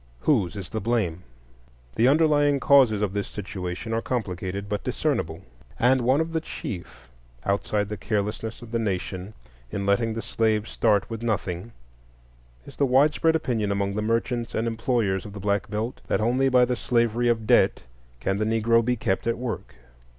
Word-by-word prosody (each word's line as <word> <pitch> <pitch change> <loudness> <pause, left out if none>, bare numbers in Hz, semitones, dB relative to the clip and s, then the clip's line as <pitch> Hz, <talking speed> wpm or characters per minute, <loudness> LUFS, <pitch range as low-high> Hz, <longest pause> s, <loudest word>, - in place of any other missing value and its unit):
Whose 110 - +2
is 95 -4 -6
the 110 - -3
blame? 100 -7 0 0.7
The 115 - +4
underlying 145 -1 +4
causes 130 -8 +5
of 100 -2 -1
this 100 -1 -2
situation 95 +1 -5
are 115 - 0
complicated 100 -5 -3
but 105 0 -3
discernible. 80 +4 -1 0.3
And 130 +2 +4
one 130 +4 +3
of 165 0 -1
the 160 - 0
chief, 85 - -7 0.4
outside 100 +1 0
the 105 0 -5
carelessness 105 +2 -3
of 115 - -11
the 115 - 0
nation 95 -1 -3 0.3
in 100 +6 -3
letting 110 +3 +1
the 115 - -4
slave 110 -1 0
start 105 -3 +2
with 115 -1 -6
nothing, 100 -2 -2 0.9
is - - -13
the 140 - +3
widespread 150 +5 +3
opinion 115 -9 0
among 100 0 0
the 105 - -2
merchants 115 +2 -1
and 115 +1 0
employers 115 -5 0
of 105 - -9
the 100 - -7
Black 100 +1 -1
Belt 110 +4 -3
that - - +1
only 125 +5 +2
by 125 -1 +5
the 125 0 -1
slavery 120 -1 +1
of 115 -2 +1
debt - - +3 0.4
can 95 +10 -1
the 110 - +1
Negro 115 +1 +3
be 125 +2 +1
kept 95 -2 -1
at 115 - +1
work. 120 -2 -5
110 Hz, 175 wpm, -25 LUFS, 100-120 Hz, 0.9 s, causes